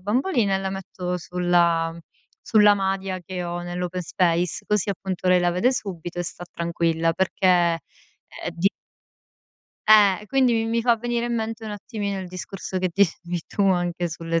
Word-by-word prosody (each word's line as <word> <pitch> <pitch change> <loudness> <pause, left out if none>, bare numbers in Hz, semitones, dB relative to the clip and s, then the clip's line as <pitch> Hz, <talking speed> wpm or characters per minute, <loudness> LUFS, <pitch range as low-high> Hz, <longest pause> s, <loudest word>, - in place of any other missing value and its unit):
bambolina 220 - +1
e - - -2
la 190 0 -3
metto 180 -2 -4
sulla 170 -2 +1 0.5
sulla 210 -2 +6
madia 195 -1 -2
che 185 -1 -4
ho 175 0 -4
nell' 175 +1 -4
open 180 0 -3
space, 170 0 0
così 210 -1 +1
appunto 190 -1 -3
lei 180 -1 +5
la 175 - +2
vede 185 +9 +2
subito 175 -7 -4
e - - 0
sta 175 0 -6
tranquilla, 165 -1 0
perché 190 +1 0 0.3
è - - -13 0.7
di 170 +4 +2 1.2
Eh, 205 -3 +6
e 210 - -13
quindi 260 0 +3
mi 225 -1 +1
mi 230 0 0
fa 235 -1 +4
venire 240 +1 -2
in 240 - -1
mente 225 0 -4
un 215 - -5
attimino 205 -1 -4
il 185 - -5
discorso 185 +1 -6
che 185 -1 0
dicevi 175 -2 0
tu, 200 - -1
anche 175 -1 0
sulle 165 0 -2
185 Hz, 175 wpm, -24 LUFS, 175-210 Hz, 1.2 s, sulla